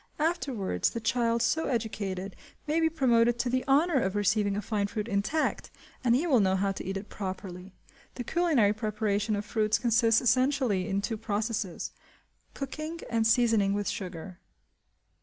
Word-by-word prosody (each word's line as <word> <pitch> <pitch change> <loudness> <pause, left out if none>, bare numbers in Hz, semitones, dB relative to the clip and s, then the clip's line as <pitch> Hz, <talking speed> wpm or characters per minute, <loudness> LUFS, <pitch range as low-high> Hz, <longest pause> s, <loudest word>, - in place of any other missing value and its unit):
Afterwards, 275 - 0
the 230 - -5
child 230 0 +1
so 320 +7 +1
educated 200 -6 -3 0.3
may 305 +2 +1
be 325 0 +3
promoted 240 -6 +3
to 245 0 -1
the 255 0 +1
honour 290 +2 +3
of 190 -1 -1
receiving 205 0 +1
a - - -1
fine 205 -3 -1
fruit 210 +1 -4
intact, 215 +9 -1 0.3
and 240 -1 +4
he 290 +7 +1
will 275 -8 +4
know 190 -2 +3
how 195 +1 +1
to 195 - -6
eat 190 +1 -3
it 200 +2 -7
properly. 190 -1 -7 0.4
The 245 - -4
culinary 290 -9 +2
preparation 215 -1 -1
of 205 0 -4
fruits 215 0 +1
consists 230 -1 +3
essentially 255 -5 +2
in 200 +1 -1
two 225 +1 -2
processes: 210 -3 -3 0.6
cooking, 310 +4 -5
and 225 -1 +2
seasoning 225 -4 +3
with 205 0 -2
sugar. 180 -1 -5
220 Hz, 160 wpm, -28 LUFS, 200-250 Hz, 0.6 s, and